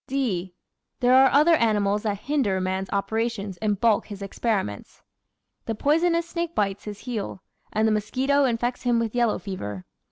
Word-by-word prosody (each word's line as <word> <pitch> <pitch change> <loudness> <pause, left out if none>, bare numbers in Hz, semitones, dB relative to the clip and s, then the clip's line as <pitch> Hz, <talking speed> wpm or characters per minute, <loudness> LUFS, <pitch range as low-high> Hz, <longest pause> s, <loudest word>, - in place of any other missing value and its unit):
(d) 195 -10 -2 0.4
But 250 - -2
there 250 +1 +6
are 265 0 +7
other 305 +4 +5
animals 210 -6 +2
that 205 -2 -2
hinder 260 -10 0
man's 190 +1 -2
operations 205 -1 -2
and 205 0 -1
baulk 225 -3 +2
his 205 -2 -7
experiments. 195 - -3 0.6
The 225 - -1
poisonous 335 +6 +2
snake 340 -1 -3
bites 200 -1 -1
his 205 -1 -7
heel, 215 -6 -5 0.3
and 215 +1 +2
the - - +2
mosquito 265 +7 +1
infects 240 0 -1
him 245 -1 +2
with 230 -2 -1
yellow 240 -3 +2
fever. 105 - -6
220 Hz, 165 wpm, -25 LUFS, 200-255 Hz, 0.6 s, are